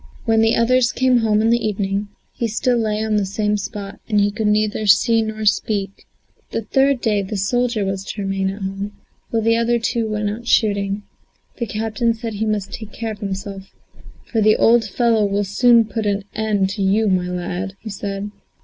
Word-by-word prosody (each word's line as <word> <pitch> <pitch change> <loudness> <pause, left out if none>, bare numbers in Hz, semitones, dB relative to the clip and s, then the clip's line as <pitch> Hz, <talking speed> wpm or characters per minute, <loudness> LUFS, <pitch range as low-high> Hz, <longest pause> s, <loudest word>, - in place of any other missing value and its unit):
When 225 -1 +3
the 225 0 +3
others 245 +1 +3
came 255 -1 +3
home 215 -1 +2
in 225 - +3
the 235 0 +2
evening, 200 -1 -1 0.3
he 235 - -2
still 245 +3 +1
lay 215 -1 -1
on 215 -1 +1
the 205 - +1
same 210 +2 -1
spot 200 0 -6
and 205 -1 +2
could 220 -1 0
neither 215 0 +1
see 225 +3 +5
nor 220 0 -4
speak. 200 -1 0 0.4
The 225 - -3
third 270 +2 +2
day 210 -3 +1
the 200 +2 -4
soldier 235 +2 0
was 195 0 -3
to 205 0 -5
remain 195 0 -1
at 195 +1 -6
home, 195 +2 -4 0.4
while 225 -1 0
the 230 +1 +3
other 235 +1 +2
two 230 -1 -1
went 210 -1 -1
out 230 +3 -8
shooting. 200 -3 +1 0.5
The 235 - -3
captain 225 +2 -1
said 225 -1 -5
he 215 +2 -2
must 210 -2 -2
take 220 -3 -7
care 225 -1 -4
of 210 - -8
himself, 195 -1 -5 0.6
"for 225 - -1
the 215 0 +4
old 235 0 +5
fellow 225 +1 +2
will 200 0 +1
soon 230 +4 +4
put 215 0 -3
an 200 0 0
end 210 -3 0
to 200 - -4
you, 205 +3 +2
my 185 -2 +1
lad," 180 +2 -4
said 200 -1 -4
he. 205 - -5
210 Hz, 200 wpm, -20 LUFS, 200-225 Hz, 0.6 s, see